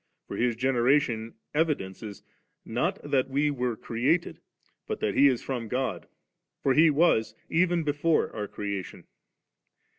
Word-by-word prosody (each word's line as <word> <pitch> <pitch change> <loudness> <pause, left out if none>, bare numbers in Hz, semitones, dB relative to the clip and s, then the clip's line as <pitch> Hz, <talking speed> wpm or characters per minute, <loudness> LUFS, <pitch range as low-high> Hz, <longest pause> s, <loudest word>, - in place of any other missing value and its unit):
For - - -6
His 120 -1 +1
generation 120 -2 +1 0.2
evidences, 110 - -2 0.4
not - - -1
that 135 -1 0
we 145 +2 +1
were 125 -4 -1
created, 135 +12 0 0.5
but - - -3
that 105 - 0
He 140 - +6
is 130 -4 +1
from 125 -4 -4
God; 125 -7 -2 0.6
for 135 - +3
He 155 +4 +6
was 145 -7 +2
even 175 0 +2
before 150 +2 +1
our 105 -2 -3
creation. 100 -2 -5
130 Hz, 130 wpm, -27 LUFS, 115-150 Hz, 0.6 s, He